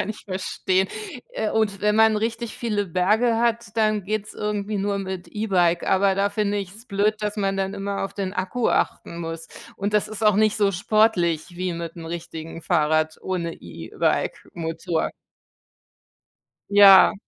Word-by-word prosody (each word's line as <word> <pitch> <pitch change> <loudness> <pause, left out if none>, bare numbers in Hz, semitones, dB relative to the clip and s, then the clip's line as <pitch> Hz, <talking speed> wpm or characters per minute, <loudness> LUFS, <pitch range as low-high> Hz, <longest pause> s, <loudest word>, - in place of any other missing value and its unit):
kann - - -2
ich 215 - -7
verstehen, 185 0 -1 0.4
äh, 220 - -2
und 210 -3 0
wenn 210 0 +2
man 220 0 +5
richtig 225 +2 -3
viele 210 -4 -1
Berge 210 +7 +2
hat, 235 -2 0
dann 215 -2 +2
geht’s 210 +1 -3
irgendwie 210 0 -2
nur 200 0 -1
mit 190 -2 -5
E-Bike, 180 -5 +1
aber 195 0 +3
da 200 +1 +1
finde 205 0 0
ich's 200 +4 -8
blöd, 210 0 +1
dass 210 0 -2
man 195 -1 0
dann 195 +1 -2
immer 200 0 -3
auf 195 - -7
den 195 -2 -3
Akku 190 +7 -1
achten 170 - -1
muss 165 -1 -6 0.3
und 200 +2 -2
das 210 - +2
ist 215 0 -5
auch 210 -2 +5
nicht 215 0 +3
so 205 -2 +3
sportlich 180 -4 +2
wie 180 0 -2
mit 170 0 -6
'nem 165 -1 -8
richtigen 165 -1 -7
Fahrrad 155 0 +1
ohne 170 -3 -3
E-Bike-Motor. 160 - -2 1.6
Ja. 200 0 +8
200 Hz, 160 wpm, -23 LUFS, 175-215 Hz, 1.6 s, Ja